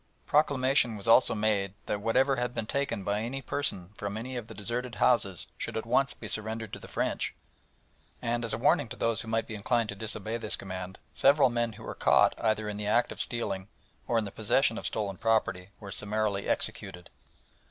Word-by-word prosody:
Proclamation 135 -5 +3
was 100 - -7
also 115 +1 +6
made 105 -3 +1
that 105 - -2
whatever 130 +5 +3
had 125 0 -2
been 110 - -2
taken 140 -5 -1
by 100 +2 0
any 125 +4 -3
person 105 -10 -2
from 100 +1 -4
any 125 +3 -5
of 120 -3 -5
the - - -10
deserted 120 +4 -3
houses 100 -8 +3
should - - -3
at 110 - -3
once 130 +3 +2
be - - -8
surrendered 110 0 -3
to - - -5
the - - -11
French, - - -1 0.8
and, 120 0 -1
as 115 - -2
a 110 - 0
warning 115 - +3
to - - -6
those 115 -1 0
who 115 - -10
might 115 0 0
be - - -7
inclined 110 +2 0
to 100 - -4
disobey 110 +1 -3
this 110 -2 -2
command, 95 -1 -6 0.2
several 140 -2 +5
men 120 -1 0
who - - -12
were - - -5
caught - - +4
either 110 -1 +1
in 105 -1 -4
the 105 0 -3
act 120 +3 +3
of - - -4
stealing 100 -5 -3 0.4
or 120 - +2
in 110 - +1
the 100 - -6
possession 115 +3 +2
of - - -3
stolen 100 -3 -2
property 105 -5 +1
were 100 -2 -8
summarily 105 0 -1
executed. 90 -2 -2
110 Hz, 205 wpm, -29 LUFS, 100-120 Hz, 0.8 s, also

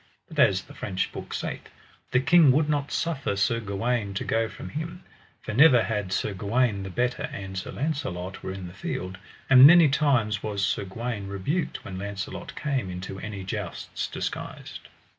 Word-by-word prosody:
But - - -6
as - - +4
the - - -14
French 95 0 -2
book - - -8
saith, - - -4 0.4
the 125 - +3
king 160 +1 +6
would 150 +3 +3
not 145 -2 -1
suffer 140 -11 -1
Sir 100 +4 +1
Gawaine 105 0 -2
to - - -2
go 115 0 0
from - - -8
him, 165 +4 -6 0.4
for - - -4
never 125 -1 +7
had 105 -4 -2
Sir 100 - -1
Gawaine 105 +2 +1
the 95 - -5
better 125 +6 -1
an 100 -1 -6
Sir 95 - -4
Launcelot 95 - -3
were - - -5
in 95 -1 -6
the 90 - -9
field; 95 +2 -5 0.3
and 135 0 +10
many 170 -1 +8
times 130 -8 +2
was 100 -2 -1
Sir 100 - -1
Gawaine 105 +1 -4
rebuked 100 - -2
when 95 -1 -6
Launcelot 100 -1 -6
came 135 -10 -2
into 95 +2 -6
any 100 -2 -6
jousts 95 -1 -4
disguised. - - -6
105 Hz, 180 wpm, -26 LUFS, 95-135 Hz, 0.4 s, and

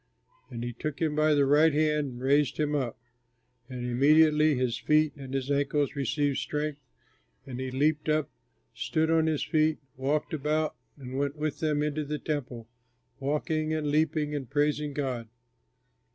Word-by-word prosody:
And 120 -2 -6
he 120 0 -4
took 145 +4 -5
him 155 -2 0
by 155 0 +3
the 140 -1 +4
right 150 +4 +5
hand 150 -1 +2
and 120 - -9
raised 140 +1 +2
him 150 -1 +1
up. 130 -6 -2 0.7
And 125 -1 -5
immediately 150 +4 +4
his 125 -2 -1
feet 150 +4 +3
and 135 -2 -9
his 135 +1 -2
ankles 145 +1 +1
received 140 +1 0
strength 150 -1 -3 0.7
and 130 -2 -7
he 130 0 -3
leaped 150 +4 +1
up, 155 -2 +2 0.5
stood 160 0 0
on 160 -1 +3
his 155 -2 0
feet, 155 -1 +2 0.2
walked 145 +4 -1
about 155 +1 0 0.2
and 130 -1 -6
went 140 +1 -1
with 150 -1 -3
them 150 -2 +1
into 150 0 -1
the 150 +1 -3
Temple, 130 -7 -4 0.5
walking, 155 +3 -1
and 150 -2 -1
leaping 150 0 +1
and 140 -4 -4
praising 145 0 0
God. 130 -5 -3
150 Hz, 165 wpm, -28 LUFS, 135-155 Hz, 0.7 s, right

